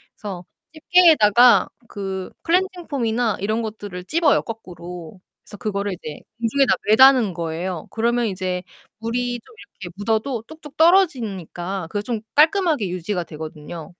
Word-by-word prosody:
그래서 190 -4 -7 0.3
집게에다가 295 - +5 0.2
그 190 -2 -5
클렌징 360 0 0
폼이나 235 -4 0
이런 215 +3 -1
것들을 205 -5 -7
집어요, 315 - +2
거꾸로. 180 -5 -9 0.2
그래서 205 - -12
그거를 200 -3 -2
이제 155 -4 -8 0.2
공중에다 235 +3 +2
매다는 240 -2 +6
거예요. 170 +1 -4
그러면 235 +1 0
이제 185 -2 -3 0.4
물이 245 +2 -2
좀 450 - -19 0.3
이렇게 175 -2 -7
묻어도 220 +3 -1
뚝뚝 310 -2 -13
떨어지니까 205 - +1
그게 205 +3 -2
좀 225 -1 -3
깔끔하게 310 - +3
유지가 180 +1 -3
되거든요. 155 +1 -8
215 Hz, 340 characters per minute, -21 LUFS, 185-260 Hz, 0.4 s, 매다는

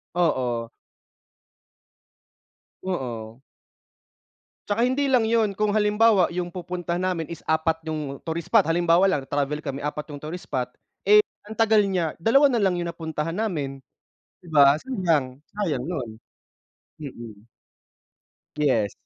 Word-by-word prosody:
Oo. 125 -9 0 2.1
Oo. 120 -9 -5 1.3
Tsaka 210 +2 0
hindi 260 +4 +2
lang 250 -5 +3
'yun 225 -3 +2
kung 210 +1 0
halimbawa 210 -2 +4
'yung 175 0 -2
pupuntahan 175 0 -4
namin 170 -4 -2
is 170 -2 -9
4 160 0 0
'yung 150 -3 -4
tourist 165 0 -4
spot, 225 -4 +5
halimbawa 170 +2 +3
lang 170 -7 +2
travel 145 +1 -1
kami 140 -3 -4
4 150 0 -5
tourist 155 +5 -8
spot, 125 -1 -2 0.3
eh, 210 +2 +7 0.2
ang 215 - -8
tagal 220 -2 +4
niya, 180 -5 -1
dalawa 275 - +4
nalang 195 -8 +1
'yung 170 - -3
napuntahan 165 +1 -4
namin 150 -11 -2 0.6
'di 180 - -18
ba, 145 -2 +5
sayang 160 - -1
sayang 185 -11 -2
'yun. 135 -7 -4 0.9
Mm. 115 -7 -9 1.1
Yes. 120 -9 +2
165 Hz, 125 wpm, -24 LUFS, 145-200 Hz, 2.1 s, eh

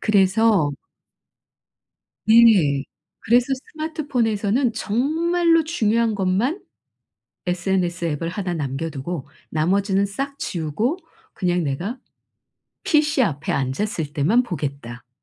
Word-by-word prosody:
그래서 200 -4 +3 1.6
네. 210 -12 +5 0.4
그래서 240 +2 +3 0.3
스마트폰에서는 250 -7 0
정말로 330 +10 +1
중요한 230 -7 +1
것만 205 - 0 0.8
SNS 180 -1 -1
앱을 165 +1 -2
하나 185 -1 -3
남겨 145 +1 -3
두고 150 +1 -5 0.2
나머지는 195 +5 +1
싹 275 +8 -4
지우고 185 - -2 0.3
그냥 180 -3 0
'내가 175 - -3 0.9
피씨 300 -2 +3
앞에 160 - -1
앉았을 150 - -2
때만 200 - +3
보겠다.'라든가 135 - -6
200 Hz, 235 characters per minute, -22 LUFS, 160-240 Hz, 1.6 s, 네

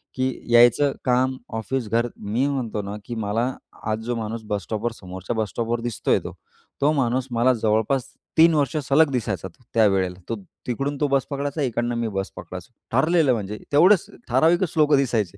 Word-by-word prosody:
की 130 0 +1 0.3
यायचं 120 +4 +6
काम, 130 +1 +2 0.2
ऑफिस, 120 +1 -2
घर. 115 +2 +1
मी 110 +6 -1
म्हणतो 120 -7 -2
ना, 100 +1 -6
की 120 - -5
मला 110 +1 -1 0.5
आज 110 - -1
जो 120 - -1
माणूस 110 0 -4
बस 105 -1 -2
स्टॉपवर 115 +2 -2
समोरच्या 95 +1 -6
बस 110 -2 -1
स्टॉपवर 115 0 -2
दिसतोय 120 -3 0
तो - - -8 0.5
तो 145 - +4
माणूस 130 -2 0
मला 120 +2 +3
जवळपास 110 +3 +1 0.3
3 165 +1 +7
वर्ष 145 -1 +1
सलग 145 +3 +4
दिसायचा 105 -7 -2
त 90 - -20
त्यावेळेला. 95 -5 +3
तो 115 - -1 0.3
तिकडून 140 +4 -2
तो 145 - +2
बस 135 -1 +1
पकडायचा 145 +1 -3
इकडनं 120 -2 -1
मी 115 -1 -1
बस 95 -2 -3
पकडायचो. 90 +4 -9 0.2
ठरलेलं 150 +2 +3
म्हणजे 105 -1 -4
तेवढंच 180 +6 +5 0.2
ठराविकच 165 +7 +3
लोकं 150 -2 +5
दिसायचे, 110 -8 0
120 Hz, 175 wpm, -23 LUFS, 110-140 Hz, 0.5 s, 3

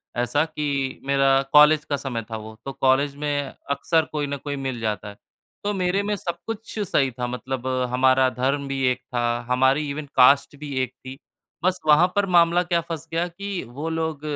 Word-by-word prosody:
ऐसा 120 +5 +1
कि 140 -4 -3
मेरा 135 -1 +3
कॉलेज 150 +1 +7
का 145 - -1
समय 125 -5 -4
था 110 - -3
वो, 110 0 -9
तो 135 - -5
कॉलेज 140 +2 +2
में 145 -1 -2 0.2
अक्सर 155 +3 +1
कोई 150 -1 -2
ना 140 0 -3
कोई 145 +1 -5
मिल 135 -3 -4
जाता 105 -2 -3
है। 100 - -11 0.5
तो 205 - -1
मेरे 190 +1 0
में 210 +1 -1
सब 175 -3 -4
कुछ 225 0 -6
सही 145 -9 +1
था 125 0 -4
मतलब 130 +1 -4 0.3
हमारा 130 0 +4
धर्म 135 +3 -1
भी 135 -1 -3
एक 125 0 -4
था, 120 -2 -1
हमारी 130 +4 +2
इवन 145 +2 -4
कास्ट 140 +3 +5
भी 145 -2 -6
एक 130 0 -5
थी, 130 +1 -8 0.5
बस 185 0 +1
वहाँ 155 +4 +6
पर 205 -1 +3
मामला 170 +1 +5
क्या 170 -1 0
फँस 165 -1 -7
गया 170 +2 0
कि 195 +2 -5
वो 145 +7 -5
लोग 160 -2 -2
140 Hz, 195 wpm, -23 LUFS, 130-165 Hz, 0.5 s, कॉलेज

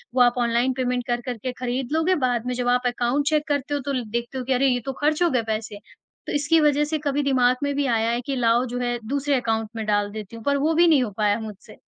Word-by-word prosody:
वो 255 - +4
आप 245 0 +4
online 240 +2 +1
payment 250 -1 -1
कर, 240 0 -1
कर 245 -1 -5
के 255 +4 -4
ख़रीद 250 +1 -3
लोगे। 325 +4 +2
बाद 245 -2 -1
में 250 - -2
जब 245 0 -2
आप 250 0 -2
अकाउंट 245 +3 0
चेक 305 0 0
करते 290 -1 -1
हो 290 - 0
तो 280 - -2
ल 255 -2 -1
देखते 235 +3 -3
हो 255 - -3
कि 265 - +1
अरे! 265 +2 +3
ये 250 -2 +2
तो 270 - -3
ख़र्च 305 +3 +2
हो 345 - +3
गए 250 -5 0
पैसे। 215 -1 -5 0.5
तो - - -3
इसकी 290 +3 +3
वजह 295 -1 +3
से 310 +1 -2
कभी 285 +1 0
दिमाग 255 -2 +3
में 285 0 0
भी 285 0 0
आया 230 -3 +1
है 240 +1 -1
कि 275 - -2
लाओ 240 0 +2
जो 245 0 -4
है 240 -1 -1
दूसरे 280 +2 0
अकाउंट 225 -3 -1
में 220 -1 -4
डाल 205 -1 0
देती 215 +1 -8
हूँ, 225 - -10
पर 280 0 +2
वो 305 +4 +1
भी 340 +2 +5
नहीं 300 -6 +4
हो 220 - -4
पाया 210 0 +2
मुझसे। 215 -2 -10
250 Hz, 280 wpm, -23 LUFS, 235-285 Hz, 0.5 s, भी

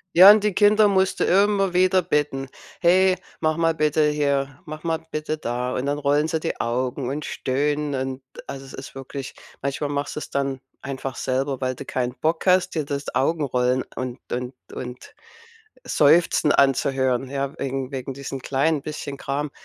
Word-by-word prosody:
Ja 185 +4 +11
und 210 0 +4
die 210 -2 +1
Kinder 210 +1 +5
musst 190 -1 +2
du - - +3
immer 195 0 +3
wieder 185 +1 +4
bitten: 145 -4 -1 0.3
„Hey, 185 +2 +5 0.3
mach 155 0 +1
mal 165 -1 +2
bitte 155 0 +2
hier, 140 -2 0
mach 155 0 -8
mal 165 -1 0
bitte 155 0 -2
da.“ 125 -2 -3
Und 125 - -2
dann 145 +1 -1
rollen 145 +1 +2
sie 160 0 -1
die - - -3
Augen 125 +2 -1
und 145 +2 -3
stöhnen 145 +2 -1
und, 130 0 -3 0.2
also, 135 -1 -7
es 135 - -12
ist 130 - -9
wirklich 135 0 -7 0.3
manchmal 140 +1 -2
machst 145 0 -3
du's 150 - -6
dann 135 -1 -1 0.2
einfach 135 -1 -5
selber, 135 +1 -1
weil 130 0 -1
du 140 - -8
kein 125 -1 -2
Bock 160 +5 -1
hast 185 0 +4
dir 155 -3 -1
das 140 0 -4
Augenrollen 130 -3 +1
und 125 -1 -4
und 125 +1 -3 0.2
und 125 0 -8 0.7
Seufzen 155 0 +4
anzuhören, 135 -1 +2
ja, 140 +1 -3
wegen 135 -1 -3
wegen 135 0 -4
diesen 135 0 -6
kleinen 140 +4 +1
bisschen 145 -1 -6
Kram, 140 +2 -3
140 Hz, 175 wpm, -23 LUFS, 130-155 Hz, 0.7 s, Ja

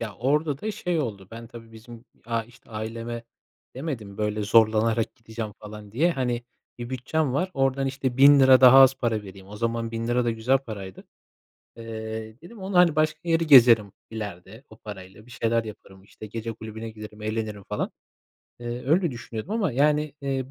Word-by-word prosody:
Ya, 110 -4 -5
orada 145 +2 0
da 215 - -2
şey 180 -4 -2
oldu, 100 -8 -5
ben 115 +1 -9
tabii 115 -1 -13
bizim 115 +1 -13 0.2
a 115 -1 -1
işte, 120 +1 -21
aileme 115 +2 -5 0.5
demedim, 120 -8 -6
böyle, 105 0 -1
zorlanarak 110 +1 +3
gideceğim 110 -2 -7
falan 105 -1 -10
diye. 165 +9 +2
Hani, 125 -3 -2 0.4
bir 120 +1 -6
bütçem 130 +2 -1
var, 180 +7 -1
oradan, 135 0 +1
işte, 135 -2 -2
1.000 140 +1 +7
lira 130 -1 +7
daha 130 +1 +9
az 135 0 +8
para 115 -5 -1
vereyim. 95 -1 -12
O 105 - -9
zaman 115 0 -2
1.000 115 0 -4
lira 120 0 +1
da 120 - +1
güzel 115 +4 +1
paraydı. 100 -7 -9 0.7
Eee, 110 0 -7
dedim 220 +6 -13
onunla, 190 -1 -1
hani, 170 -3 +5
başka 155 0 +1
yeri 165 -1 +1
gezerim, 115 -7 +7 0.2
ileride, 105 +1 -8
o 110 - -14
parayla 105 0 -11
bir - - -17
şeyler 115 0 0
yaparım, 95 -3 -12
işte, 110 - -11
gece 115 +2 -5
kulübüne 110 0 -8
giderim, 105 -1 -11
eğlenirim 110 -1 -3
falan. - - -2 0.7
Eee, 120 +1 -6
öyle 165 +3 +3
düşünüyordum 120 - -7
ama, 210 - 0
yani, 150 +3 +1
eee, 135 -1 -3
115 Hz, 180 wpm, -25 LUFS, 110-135 Hz, 0.7 s, daha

